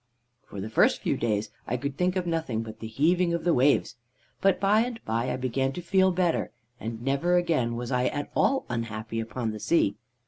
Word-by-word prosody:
"For 100 - -8
the 105 +3 -4
first - - +3
few - - +1
days 105 -2 -1 0.2
I 125 - -1
could 140 +2 -4
think 180 +4 +1
of 185 -1 -1
nothing 160 -10 -1
but 110 -1 -9
the 110 - -6
heaving 170 +9 +2
of 170 - -4
the 175 0 +3
waves; 135 0 +2 0.4
but 195 -1 +3
by 205 +3 +4
and 240 -1 -3
by 115 +3 -1
I - - -1
began 130 +1 -1
to 180 - -5
feel 190 +2 +3
better, 175 -2 +1 0.3
and 115 +1 -5
never 140 +7 +1
again 150 -10 +1
was 120 +2 -4
I 125 0 +2
at 145 0 -3
all 270 0 +2
unhappy 115 -1 -4
upon 115 +1 -3
the 110 - -6
sea. 105 -7 +2
135 Hz, 210 wpm, -27 LUFS, 115-175 Hz, 0.4 s, by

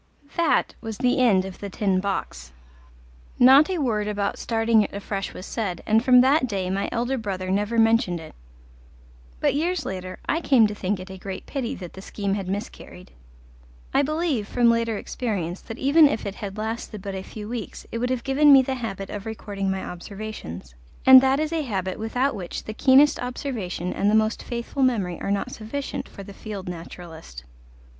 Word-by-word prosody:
That 335 -3 +2
was 225 -2 -6
the 250 0 +2
end 205 -7 +4
of 190 -1 -8
The 200 - -5
Tin 190 -1 0
Box; 125 - -4 0.8
not 270 +6 +7
a 370 - -1
word 220 -8 0
about 205 -1 -2
starting 225 -1 +2
it 205 - -2
afresh 200 -1 -4
was 185 - -9
said, 195 -7 -3
and 220 +1 +3
from 250 -1 +7
that 265 +1 +3
day 190 -4 -2
my 195 +1 -1
elder 245 +3 -1
brother 185 -3 -3
never 205 +4 0
mentioned 225 -6 +3
it. 160 -1 -11 1.1
But - - +2
years 345 +5 -1
later 185 -1 -5
I 325 - +1
came 260 -8 +5
to 210 - -1
think 200 -1 -2
it 185 +1 -9
a 190 - -9
great 190 0 -6
pity 265 -5 -3
that 180 -3 -9
the 190 - -9
scheme 200 0 -3
had 195 -2 -3
miscarried. 190 -2 -6 0.8
I 275 - +4
believe, 300 -7 -1
from 240 0 +3
later 230 -2 0
experience, 195 -7 -3
that 225 - -8
even 290 +4 +6
if 225 - -3
it 200 - -3
had 200 0 -7
lasted 220 -2 -4
but 195 - -4
a 190 - -4
few 210 +2 -8
weeks 235 -1 -6
it 230 - -3
would 250 +1 -1
have 255 -2 -1
given 285 +2 +5
me 270 -1 +8
the 265 - -2
habit 195 -6 -5
of 205 +1 -6
recording 200 -3 -4
my 190 0 -2
observations, 180 - -8 0.3
and 260 0 +10
that 265 +1 +2
is 310 +1 -1
a 325 - 0
habit 190 -8 -3
without 245 +5 0
which 180 -4 -6
the 215 - -6
keenest 270 +5 +5
observation 235 - -4
and 200 - +1
the 215 - +3
most 220 +1 +2
faithful 240 +3 -4
memory 205 -10 +1
are - - -3
not 200 0 -1
sufficient 250 +6 -5
for 200 - -10
the 200 +1 -10
field 200 -2 -7
naturalist. 165 - -9
215 Hz, 195 wpm, -24 LUFS, 190-250 Hz, 1.1 s, and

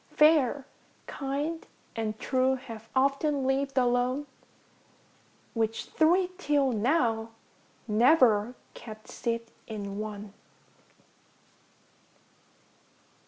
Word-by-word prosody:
Fair, 290 -3 +4 0.4
kind, 290 +4 -3 0.3
and 220 -1 -2
true, 260 0 +2
have 230 -4 -10
often 275 +1 +2
livŌĆÖd 270 +1 0
alone, 250 +3 +2 1.3
Which 225 -1 -1
three 355 +4 +3
till 285 -5 +2
now, 225 -1 +1 0.5
never 235 -1 +4 0.2
kept 215 -1 -11
seat 230 -1 -3 0.2
in 205 -2 -5
one. 210 -1 -6
255 Hz, 75 wpm, -28 LUFS, 225-280 Hz, 1.3 s, Fair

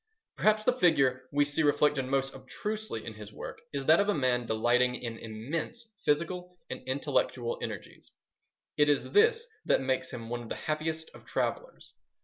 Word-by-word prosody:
Perhaps 215 0 +3
the 250 - +3
figure 135 - +3
we 145 0 +3
see 145 +2 0
reflected 145 -2 +3
most 135 +1 0
obtrusively 215 - -4
in 115 - -5
his 105 0 -10
works - - -8
is 140 -2 -3
that 160 +3 +6
of 200 +1 +2
a 205 - +3
man 125 -4 +1
delighting 120 +3 +3
in 115 -2 -5
immense 150 - -5
physical 180 +4 0
and - - -4
intellectual 130 -3 0
energies. - - -7 0.7
It 145 0 +5
is 145 - +1
this 450 +2 +4 0.2
that - - +4
makes 130 0 0
him 115 -1 -6
one 120 +1 -3
of 115 - -9
the - - -2
happiest 160 +1 -3
of - - -14
travellers. - - -3
145 Hz, 170 wpm, -30 LUFS, 125-175 Hz, 0.7 s, that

